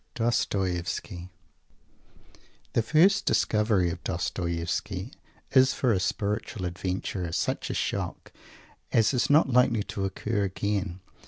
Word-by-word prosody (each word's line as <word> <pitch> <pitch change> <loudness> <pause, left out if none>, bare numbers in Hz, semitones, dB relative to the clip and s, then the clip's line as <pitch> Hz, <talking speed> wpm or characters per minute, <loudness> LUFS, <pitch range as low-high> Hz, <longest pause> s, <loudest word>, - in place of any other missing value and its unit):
DOSTOIEVSKY 95 -5 -1 1.4
The - - +3
first 160 - +4
discovery 105 -5 +2
of 85 -4 -7
Dostoievsky 90 - -3 0.4
is, 130 0 +5
for 125 -4 +2
a 95 - +1
spiritual 100 +1 -2
adventurer, 90 0 -3
such - - -1
a - - -2
shock - - -3 0.6
as 115 +3 +3
is 125 +3 +1
not 145 -2 +5
likely 120 -3 +4
to 100 -1 -4
occur 105 +3 -2
again. 95 -1 -2
100 Hz, 110 wpm, -27 LUFS, 90-115 Hz, 1.4 s, is